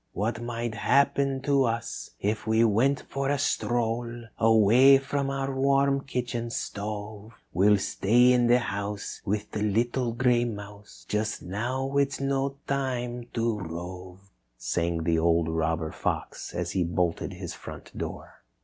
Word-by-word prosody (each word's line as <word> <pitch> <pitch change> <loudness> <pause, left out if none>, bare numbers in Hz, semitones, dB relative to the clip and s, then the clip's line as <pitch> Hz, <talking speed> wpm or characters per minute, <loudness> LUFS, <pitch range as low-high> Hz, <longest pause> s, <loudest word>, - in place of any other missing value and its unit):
"What 115 +4 -2
might 120 -1 -3
happen 135 +3 +2
to 140 -2 +3
us 115 0 -3
if 110 +2 -2
we 110 +1 +4
went 115 +6 +2
for 135 0 -2
a 145 - +2
stroll 120 -3 -1 0.2
Away 115 +5 +6
from 135 0 -2
our 135 0 -2
warm 140 0 +2
kitchen 120 -3 -3
stove. 105 0 -5 0.2
We'll 100 +4 +5
stay 120 +6 +3
in 120 -1 +3
the 120 +1 +6
house 100 -3 -4
with 105 +1 -2
the 105 - -3
little 120 +4 +1
gray 120 0 +3
mouse; 105 -2 -8
Just 105 +1 -2
now 130 +8 -2
it 140 -1 +2
is - - -5
no 135 0 0
time 125 -3 -2
to 115 -2 0
rove," 90 +2 -8 0.3
sang 85 +6 -1
the 80 0 +2
old 85 0 +2
robber 80 0 -1
fox - - -4
as - - -2
he 95 - +1
bolted 85 0 -1
his - - -6
front - - -10
door. - - -7
115 Hz, 150 wpm, -27 LUFS, 100-130 Hz, 0.3 s, Away